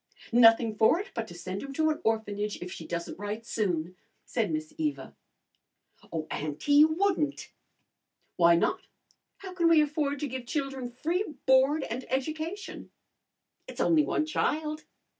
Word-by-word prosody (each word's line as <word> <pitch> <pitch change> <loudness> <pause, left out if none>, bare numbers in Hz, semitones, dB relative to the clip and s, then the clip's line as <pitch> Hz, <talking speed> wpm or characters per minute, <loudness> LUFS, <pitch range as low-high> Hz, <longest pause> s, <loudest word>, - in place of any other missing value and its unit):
"Nothing 225 -1 +6
for 225 +11 +4
it 405 - -7
but 230 -1 -3
to 175 - -11
send 185 +3 -5
him 275 0 -7
to 315 +2 +2
an 305 - -4
orphanage 210 -2 -1
if 180 0 -7
she - - -8
doesn't 170 +1 -5
write 210 +2 -5
soon," 180 -6 -2 0.3
said - - -1
Miss 310 0 -4
Eva. 305 -2 -3 1.0
"Oh, 160 -2 -3
auntie, 150 - -2
you 295 +2 +8
wouldn't!" 320 -3 -1 0.8
"Why 170 -1 +5
not? 170 - +1 0.6
How 380 -2 -9
can 340 -2 +3
we 330 -2 +6
afford 295 -1 0
to 295 - -1
give 255 -2 -6
children 270 -3 -3
free 325 - -2
board 265 +3 +4
and 245 +3 -4
education?" 315 +8 -4 0.8
"It's - - -10
only 320 -2 +4
one 305 - 0
child." 310 0 -1
275 Hz, 155 wpm, -28 LUFS, 215-310 Hz, 1.0 s, you